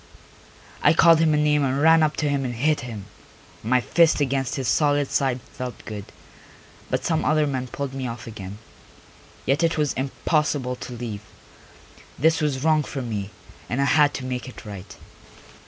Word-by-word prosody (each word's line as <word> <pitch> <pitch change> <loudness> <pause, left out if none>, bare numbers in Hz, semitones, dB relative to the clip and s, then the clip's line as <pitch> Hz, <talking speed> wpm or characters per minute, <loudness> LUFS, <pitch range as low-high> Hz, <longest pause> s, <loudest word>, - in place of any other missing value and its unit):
I - - +5
called 165 -1 +6
him 160 -1 +3
a - - +2
name 150 -1 +3
and 135 0 0
ran 160 +2 +6
up 155 -1 +1
to 150 - 0
him 140 -1 0
and 125 -2 -3
hit 150 +6 +1
him; 110 -5 -7 0.6
my 125 +3 +2
fist 165 +4 +3
against 135 0 0
his 135 -4 -3
solid 145 0 +2
side 130 -3 +1
felt 125 -1 -7
good, 105 -2 -6 0.8
but - - -1
some 160 -2 +1
other 155 0 +3
men 130 -3 -2
pulled 135 +2 -5
me 135 -1 -3
off 115 -1 -7
again. 100 -3 -8 0.9
Yet 135 +4 +2
it 165 -1 +1
was 150 -2 +1
impossible 140 -1 -1
to 125 - -8
leave. 115 -4 -5 1.0
This 160 +4 +3
was 145 -3 -1
wrong 155 -1 +4
for 135 -2 -5
me, 105 -4 -4 0.4
and 125 - -1
I 140 - +3
had 145 0 +4
to 130 - -5
make 125 0 -4
it 125 - -12
right. 100 -3 -9
135 Hz, 180 wpm, -24 LUFS, 125-150 Hz, 1.0 s, called